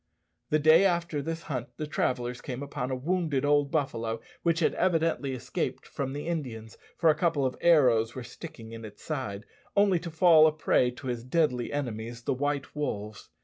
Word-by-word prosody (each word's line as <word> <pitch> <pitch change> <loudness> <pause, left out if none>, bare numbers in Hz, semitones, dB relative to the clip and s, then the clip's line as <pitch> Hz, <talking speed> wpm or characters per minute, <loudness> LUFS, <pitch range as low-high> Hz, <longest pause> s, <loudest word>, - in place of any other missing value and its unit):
The 155 - +3
day 155 +4 +6
after 170 -5 +1
this 165 +3 -4
hunt 125 -5 -5
the 155 - -3
travellers 125 -4 -1
came 130 0 -5
upon 130 -3 -4
a 130 - -1
wounded 150 -1 0
old 145 -1 +3
buffalo 115 -7 -1 0.2
which 170 -1 +1
had 155 - +3
evidently 165 -6 +1
escaped 125 - -3
from 135 -1 -4
the 145 +1 -5
Indians 125 -10 -4 0.2
(for 165 -2 +5
a - - 0
couple 160 -6 +1
of 130 - -1
arrows 125 -9 +4
were 130 - -5
sticking 115 -1 -10
in 115 0 -8
its 105 -1 -11
side), 125 -10 -4 0.3
only 200 -3 +4
to 170 +1 -6
fall 160 -1 +6
a - - +3
prey 150 -4 +2
to 125 +2 -11
his 120 -2 -3
deadly 125 -3 0
enemies, 120 -4 -4
the - - 0
white 145 +1 -2
wolves. 105 -8 -4
140 Hz, 190 wpm, -28 LUFS, 120-160 Hz, 0.3 s, day